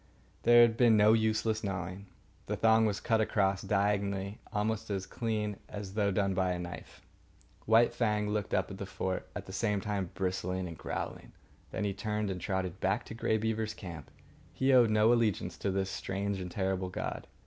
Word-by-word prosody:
There 120 0 +7
had 115 -1 +3
been 115 -3 +5
no 105 +1 +6
useless 110 0 +1
gnawing. 95 0 -4 0.4
The 105 - -1
thong 110 +1 +4
was 105 -1 -1
cut 110 -1 +2
across, 100 -3 +1
diagonally, 100 0 0
almost 110 0 -1
as 95 -2 -2
clean 105 -3 -2
as 100 -2 -6
though 105 -1 +1
done 100 0 +1
by 90 -1 +1
a - - -3
knife. 90 0 -8 0.7
White 115 +2 +5
Fang 105 -3 +1
looked 105 -1 -2
up - - 0
at 95 - -8
the 100 - -5
fort, 95 -1 -3
at - - -5
the 95 - -9
same 105 0 0
time 100 -2 -2
bristling 90 -1 -2
and 85 - -7
growling. - - -5 0.4
Then - - -3
he 100 -1 0
turned 105 0 -2
and 90 -1 -5
trotted 95 0 -2
back 100 +4 0
to - - -8
Grey 110 -1 0
Beaver's 110 0 -2
camp. 85 -8 -8 0.4
He 135 0 +2
owed 120 -3 +6
no 110 +2 +5
allegiance 105 -7 0
to 100 - -1
this 95 0 -1
strange 100 +1 -3
and 90 - -5
terrible 95 0 -1
god. 90 - -5
100 Hz, 190 wpm, -31 LUFS, 95-110 Hz, 0.7 s, There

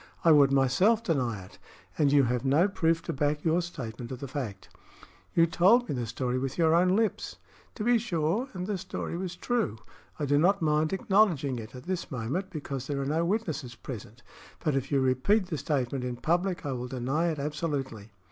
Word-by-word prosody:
I 165 - +7
would 140 -3 +6
myself 180 - +3
deny 125 - -1
it, - - -17 0.4
and 145 -2 +3
you 140 -1 +5
have 125 0 0
no 145 +8 +4
proof 165 -4 +1
to 165 - -3
back 150 +1 0
your 165 +2 +3
statement 125 -8 -7
of 130 - -5
the 140 - -5
fact." 120 -8 -5 0.7
"You 165 - +6
told 195 +9 +4
me - - -2
the 120 -3 -3
story 125 +2 -2
with 135 0 -3
your 160 -2 +4
own 180 +2 +4
lips." 220 -1 -1 0.4
"To 215 - -4
be 240 +1 +4
sure 210 - -1
and 180 -1 -4
the 200 -1 -2
story 180 -2 -5
was 175 0 -4
true. 225 - -1 0.4
I 150 - -2
do 145 +1 +3
not 195 +5 +3
mind 155 0 +1
acknowledging 190 - +2
it 110 +2 -9
at 125 - -9
this 185 +1 -3
moment, 135 - -3
because 140 -4 -5
there 140 -2 -2
are 135 - -2
no 155 +4 +1
witnesses 160 - -2
present; 115 -1 -9 0.4
but 155 -4 0
if 135 +1 -2
you 140 -1 +3
repeat 130 - +2
the 170 -3 -4
statement 135 -2 -1
in 125 -1 -3
public, 175 +6 -1
I 140 - -1
will 125 -1 -4
deny 130 +6 -1
it 160 -2 -1
absolutely." 140 -7 -3
150 Hz, 205 wpm, -28 LUFS, 130-180 Hz, 0.7 s, I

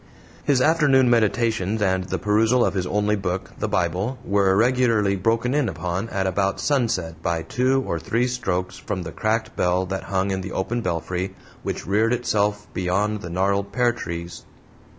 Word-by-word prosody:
His 135 -3 +2
afternoon 140 -4 +4
meditations 110 -2 +1
and 95 -2 +1
the - - -2
perusal 110 +4 +3
of - - 0
his 90 -2 -1
only 105 +1 +1
book 95 -2 -3
the - - -1
Bible 95 +9 -1
were 100 -1 +3
regularly 115 -3 +3
broken 115 +6 +1
in 145 -5 +1
upon 90 +6 -3
at 95 -2 -1
about 95 +1 0
sunset 95 - 0
by 85 -1 -1
two 130 +5 +1
or 85 - -2
three 115 +8 0
strokes 95 -8 -2
from 95 -3 -4
the 80 - -6
cracked 110 +4 -1
bell 90 +1 +1
that 95 +1 -4
hung 95 0 0
in 95 0 -1
the 95 0 -6
open 120 +5 -1
belfry 90 +1 -3 0.3
which - - -4
reared 110 +5 +2
itself 105 -4 0
beyond 100 +3 0
the 85 - -6
gnarled 100 +3 0
pear 120 +3 +2
tees. 85 -6 -6
100 Hz, 170 wpm, -23 LUFS, 95-115 Hz, 0.3 s, afternoon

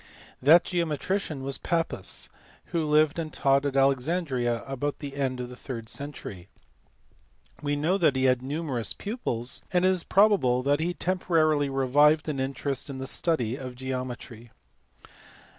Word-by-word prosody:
That! 160 +6 +7
geometrician 170 -2 -2
was 135 0 -3
Pappus 165 -1 -2 0.4
who 165 -3 0
lived 155 +1 +3
and 160 -2 -4
taught 140 0 +2
at 140 - -3
Alexandria 135 -3 +1
about 135 +1 -3
the 140 -2 -7
end 130 -2 -1
of 125 - -4
the 125 - -10
third 115 -3 -7
century. 125 -11 -7 1.1
We 145 -1 0
know 165 +7 +1
that 155 -6 +3
he 130 - +1
had 130 -1 +3
numerous 135 -3 -2
pupils, 130 - -3
and 180 0 +3
it - - +6
is 180 -3 -1
probable 190 -12 +3
that 145 +2 +2
he 175 +2 -1
temporarily 160 -5 +1
revived 145 +4 +3
an 140 -3 -2
interest 135 +1 -2
in 135 - -5
the 130 - -5
study 130 -5 0
of 130 -3 -7
geometry. 125 -2 -6
140 Hz, 150 wpm, -27 LUFS, 130-160 Hz, 1.1 s, That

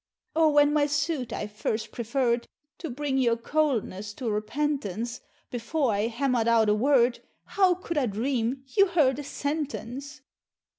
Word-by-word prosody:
Or 320 -1 +5
when 290 0 +5
my 295 -1 +3
suit 290 -3 -1
I - - -3
first 215 +1 -3
preferred, 235 0 0 0.3
To 330 - -5
bring 270 +1 -1
your 235 -3 +2
coldness 230 -7 -1
to 240 -4 -3
repentance, 230 -1 -2 0.3
Before 250 +2 0
I 205 +2 +1
hammer'd 240 -1 0
out 225 -2 +4
a - - +5
word, 245 +1 +3 0.3
How 375 -3 +3
could 340 -3 -2
I 260 - +1
dream 240 +4 -1
you 395 -2 +6
heard 295 -7 +2
a - - -4
sentence! 285 -1 -4
260 Hz, 150 wpm, -27 LUFS, 230-290 Hz, 0.3 s, you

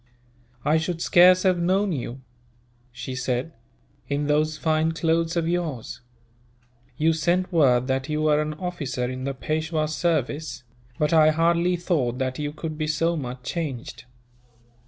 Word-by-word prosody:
"I 155 +2 +4
should 165 +1 -3
scarce 180 +2 +6
have 185 -2 +3
known 190 +3 +1
you," 130 -3 -4 0.7
she 130 +1 -6
said, 130 +4 -2 0.6
"in 145 +1 0
those 155 +1 +1
fine 160 0 +1
clothes 165 +1 0
of 165 -1 0
yours. 165 -10 -3 1.0
You 160 +1 +3
sent 175 +3 0
word 130 -6 +4
that 130 +2 -2
you 155 0 -1
were 150 -1 +3
an 150 0 -3
officer 155 -8 -3
in 130 +1 -5
the 140 0 -3
Peishwa's 155 +2 -2
service; 155 -3 -1 0.3
but 150 +2 +1
I 155 -1 +6
hardly 170 +3 +2
thought 150 -9 -1
that 130 0 -2
you 145 0 -2
could 155 0 -6
be 155 - -1
so 165 +2 +1
much 125 -4 -6
changed. 130 -6 -5
155 Hz, 150 wpm, -24 LUFS, 135-170 Hz, 1.0 s, scarce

